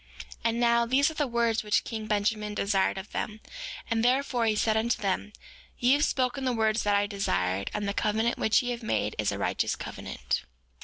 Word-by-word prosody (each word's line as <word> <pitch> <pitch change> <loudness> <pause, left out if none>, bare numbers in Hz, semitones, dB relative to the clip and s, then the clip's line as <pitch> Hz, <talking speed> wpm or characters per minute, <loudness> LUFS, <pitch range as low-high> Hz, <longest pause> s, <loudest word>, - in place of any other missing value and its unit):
5:6 - - -12
And 230 0 +1
now, 235 0 +3
these 280 +5 +3
are - - -8
the 295 -2 0
words 235 -1 +1
which 210 -1 +1
king 220 -2 -5
Benjamin 210 0 0
desired 200 -2 +1
of 190 +2 -7
them; 215 0 -4 0.5
and 230 -1 0
therefore 250 -2 +2
he 215 - +2
said 215 +1 +2
unto 230 +2 +1
them: 200 0 -1 0.5
Ye 245 +2 +4
have 290 +1 +3
spoken 260 +1 0
the 255 -1 +1
words 220 -1 +1
that 205 -1 +2
I 200 0 +3
desired; 100 - -1
and 210 -1 -3
the 200 - -1
covenant 220 +3 0
which 220 +4 +3
ye 245 - -2
have 240 0 -4
made 110 - -1
is - - +1
a - - -3
righteous - - 0
covenant. - - -4
225 Hz, 210 wpm, -28 LUFS, 210-240 Hz, 0.5 s, Ye